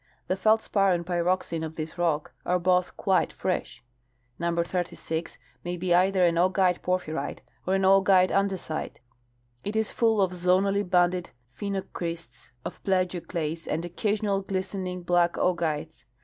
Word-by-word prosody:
The 185 - 0
feldspar 200 -1 +3
and 170 -1 -2
pyroxene 175 -1 0
of 160 0 -5
this 155 0 -5
rock 165 -4 0
are 180 - +2
both 180 0 +1
quite 190 -2 +2
fresh. 150 -10 -3 0.6
Number 170 0 +1
36 170 -2 -3 0.3
may 175 0 -3
be 175 0 +1
either 185 +1 +4
an 170 -1 +2
augite 185 0 +3
porphyrite 180 -3 -2 0.2
or 190 - +2
an 195 - +1
augite 190 -1 +5
andesite. 195 -5 -1 0.7
It 205 - -4
is 220 -1 +1
full 225 -2 +2
of 190 -2 +3
zonally 185 +3 +2
banded 180 0 +2 0.3
phenocrysts 170 - -5 0.2
of - - -6
plagioclase 175 -4 -1
and 165 - -2
occasional 200 +2 0
glistening 185 -1 -3
black 175 0 +3
augites. 160 -3 -1
180 Hz, 135 wpm, -27 LUFS, 170-190 Hz, 0.7 s, augite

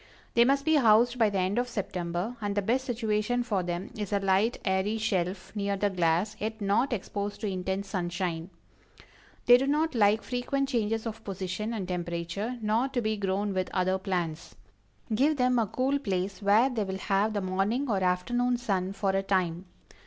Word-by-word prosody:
They 235 0 +5
must 275 +2 +2
be 315 -1 +4
housed 240 0 +4
by 220 -2 +5
the 200 - -2
end 190 +5 +1
of 245 - 0
September, 185 -1 -3
and 205 -1 -2
the 205 - +1
best 255 +6 +1
situation 230 0 0
for 210 -6 0
them 175 +2 -4
is 210 -2 -4
a 205 - +2
light, 195 +4 +2
airy 190 +3 +1
shelf 190 -3 -2
near 200 -1 -1
the 205 +1 +1
glass, 175 +3 +1
yet 220 +1 -3
not 210 +6 +1
exposed 205 -2 -3
to 215 - -1
intense 190 +1 -3
sunshine. 175 -2 -2 1.0
They 245 0 +8
do 270 +2 -1
not 305 +2 +1
like 215 -1 +3
frequent 270 +2 -1
changes 225 -3 0
of 225 0 -6
position 195 +2 -4
and 205 -5 -3
temperature, 175 +6 -3
nor 220 +5 +2
to 265 -2 -2
be 215 0 0
grown 200 0 -1
with 185 -1 -1
other 185 0 +1
plants. 175 -4 -3 0.6
Give 285 +7 +3
them 250 -1 +3
a 225 - +1
cool 265 +7 0
place 195 -5 -2
where 215 +6 +4
they 225 -4 -1
will 190 -1 -4
have 200 +2 +1
the 205 - -1
morning 195 +9 0
or 200 -5 0
afternoon 240 +8 +1
sun 195 -5 -1
for 195 -1 0
a 195 0 +1
time. 185 -2 0
205 Hz, 190 wpm, -28 LUFS, 190-235 Hz, 1.0 s, They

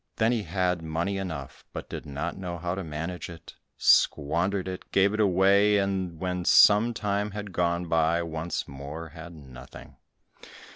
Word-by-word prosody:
Then 110 +2 +2
he 120 -3 0
had 90 -1 -1
money 85 +5 -2
enough, 80 -8 -6
but - - -6
did - - -7
not 75 +5 -4
know 90 -2 -5
how 85 +1 -3
to 95 +1 -4
manage 80 +3 -5
it, 85 -1 -11 0.2
squandered 90 +6 +2
it, 95 -1 -7
gave 100 +1 +3
it 110 - -3
away, 100 +1 +4
and 95 -3 -1
and 80 - -15
when 90 0 -2
some 105 +6 +6
time 105 0 -1
had 105 -1 -7
gone 85 0 0
by, 80 +1 +1
once 80 0 -4
more 70 +4 -8
had 80 +2 -10
nothing. 65 -4 -13
90 Hz, 165 wpm, -27 LUFS, 80-100 Hz, 0.2 s, some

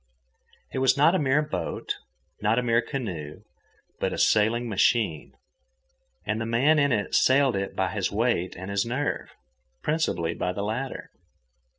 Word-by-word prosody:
It - - -3
was 130 +1 +3
not 150 +5 +5
a 190 - +2
mere 145 +1 +2
boat, 150 - -4 0.4
not 110 +2 +2
a 125 - +2
mere 115 -1 +3
canoe, 90 - -5 0.6
but - - 0
a - - -4
sailing 110 +3 +2
machine. 100 - +1 0.9
And 110 +2 -1
the - - -2
man 135 +7 +3
in 140 -1 +3
it 105 -4 -1
sailed 135 -2 +4
it 95 0 -3
by 95 -1 0
his 100 -4 -1
weight 105 -4 0
and 95 +2 -7
his 100 0 +1
nerve—principally 85 - -3
by 90 - -2
the 100 - -3
latter. 120 +6 -4
115 Hz, 155 wpm, -26 LUFS, 95-130 Hz, 0.9 s, not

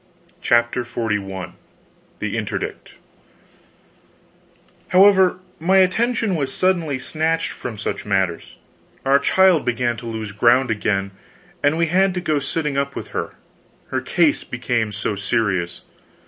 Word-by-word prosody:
CHAPTER 120 +1 +2
XLI 105 -6 -3 0.6
THE - - -3
INTERDICT - - -4 1.9
However, 190 -1 +5 0.2
my 185 +4 +3
attention 225 +3 +2
was 140 -5 -1
suddenly 170 -6 0
snatched 160 +4 -1
from 115 -3 -7
such - - -4
matters; 95 -4 -1 0.5
our 135 +1 +5
child 185 +1 +4
began 120 -1 -1
to 115 - -8
lose 110 -2 -5
ground 120 +5 +3
again, 100 -2 -1 0.5
and 145 +2 +2
we 170 - +3
had 190 +3 +2
to - - 0
go 155 -4 0
to - - -9
sitting 150 -1 -1
up 140 0 -3
with - - -6
her, - - -4 0.5
her - - -1
case 165 -4 +2
became 120 -3 -2
so 105 0 -2
serious. 95 -4 -1
130 Hz, 130 wpm, -21 LUFS, 110-170 Hz, 1.9 s, However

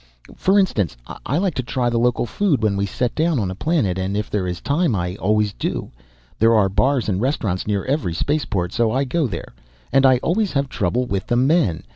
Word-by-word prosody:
For 195 +2 +2
instance, 105 - +1 0.3
I 140 - 0
like 185 -1 0
to 130 - -2
try 120 0 -1
the 115 - +1
local 125 0 +1
food 145 - 0
when 105 -2 +2
we 100 0 -1
set 120 +5 -2
down 160 -1 +1
on 95 -4 -1
a - - -4
planet, 105 - 0
and 95 +2 -2
if 105 - -3
there 95 -3 -1
is 90 -1 -4
time 145 -3 +1
I 90 -1 -2
always 105 0 +1
do. - - -4 0.5
There 115 +1 +5
are 100 -3 +3
bars 130 +6 +1
and 100 -1 -1
restaurants 110 -9 -1
near 100 -2 -1
every 130 - -1
spaceport 100 - -1
so 115 -2 +1
I 135 +3 +1
go 140 +3 0
there. 110 - -7 0.4
And 135 0 +5
I 130 -1 +6
always 200 +3 0
have 140 -1 0
trouble 120 +4 -1
with 100 -4 -3
the 120 - +1
men. 130 - +2
120 Hz, 220 wpm, -21 LUFS, 100-140 Hz, 0.5 s, I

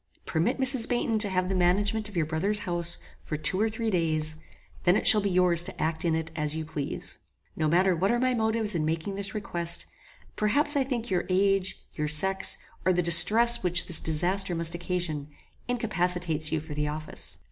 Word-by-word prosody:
Permit 185 +11 -1
Mrs. 260 -3 +2
Baynton 240 -3 0
to 210 -1 +4
have 185 -1 -1
the 190 - -2
management 200 +4 0
of 200 - -8
your 160 - +1
brother's 170 +7 -1
house 170 -1 0 0.2
for 155 - -5
two 185 +6 0
or 220 - +2
three 225 0 -3
days; 155 -3 -1 0.5
then 175 - +3
it - - -1
shall 210 - +7
be 200 - -1
yours 180 -2 +4
to 195 - -5
act 160 0 -1
in 165 -2 +1
it 160 0 -4
as 150 -1 -2
you 160 0 -4
please. 150 -2 -5 0.4
No 155 - -1
matter 180 +3 +2
what 190 +4 0
are 240 - +2
my 255 0 +1
motives 220 -2 +1
in 165 -3 -1
making 160 +5 -2
this 200 +1 -5
request: 170 -5 -1 0.5
perhaps 285 +8 +2
I 280 - +2
think 240 -4 -4
your 180 -2 0
age, 190 0 0
your 150 -1 -3
sex, 190 +6 +3 0.3
or 185 - +2
the 180 0 0
distress 230 +8 +5
which 175 -1 +2
this 170 - +3
disaster 180 +4 -1
must 165 0 0
occasion, 175 -4 -4 0.4
incapacitates 180 - 0
you 160 - 0
for 155 -1 -9
the 150 0 -2
office. 155 +1 -4
180 Hz, 200 wpm, -27 LUFS, 160-210 Hz, 0.5 s, shall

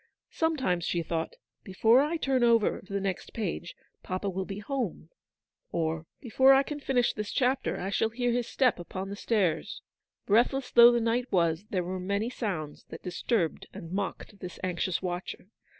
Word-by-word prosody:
Sometimes 260 - 0
she 170 0 -1
thought, 165 0 -3 0.3
"Before 225 +6 +4
I 310 +4 0
turn 265 -5 +1
over 230 -3 +3
to 195 - -16
the 200 - 0
next 195 -2 -4
page, 175 -5 -4 0.3
papa 185 +2 -3
will 190 +1 -3
be 195 0 -6
home," 260 +5 -4 0.6
or, 160 0 -2
" - - -55
Before 265 +2 +5
I 270 +1 +5
can 295 +1 -5
finish 255 -4 +1
this 210 -1 -4
chapter 260 0 0
I 190 +2 -3
shall 220 +2 +1
hear 245 +1 -1
his 240 0 0
step 250 -8 +2
upon 185 +2 -6
the 200 - -5
stairs." 195 -7 -1 0.4
Breathless 250 +5 +2
though 240 0 +9
the 240 - +2
night 235 +2 0
was, 170 0 +1
there 185 -3 0
were 185 +2 -4
many 200 +5 -1
sounds 170 - -4
that 160 - -9
disturbed 180 -1 -1
and 165 - -9
mocked 200 +1 -4
this 180 -1 -8
anxious 185 0 -1
watcher. 180 +1 -5
200 Hz, 180 wpm, -29 LUFS, 180-245 Hz, 0.6 s, though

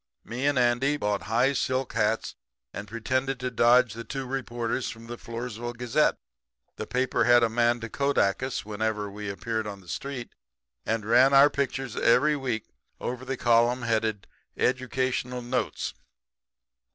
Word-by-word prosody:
Me 125 +4 -2
and 145 -2 +2
Andy 125 +4 +2
bought 105 -5 -1
high 125 +5 +3
silk 130 0 -1
hats - - 0 0.4
and 105 - -6
pretended 130 +4 -1
to 125 0 -3
dodge 120 -1 +4
the 115 +1 -7
two 135 +3 -5
reporters 120 -2 -3
of 115 0 -13
the 120 +1 -6
Floresville 120 0 -6
Gazette. 120 -1 +2 0.6
The - - -5
paper 130 0 +1
had 120 -1 +6
a 115 - +3
man 120 +1 +2
to 115 - -4
kodak 140 -5 +1
us 130 -5 -3
whenever 105 -1 -2
we 105 0 -6
appeared 110 +3 -3
on 100 -1 -6
the 95 - -19
street, 130 +5 -5 0.5
and 110 -2 -1
ran 125 +5 +5
our 140 +2 +7
pictures 135 -2 -2
every 150 +6 +4
week 125 -6 -3 0.3
over 125 +1 -4
the 135 0 -3
column 120 +1 +3
headed 110 -3 0 0.3
'Educational 130 -1 -1
Notes.' 125 +1 -2
120 Hz, 155 wpm, -27 LUFS, 115-130 Hz, 0.6 s, our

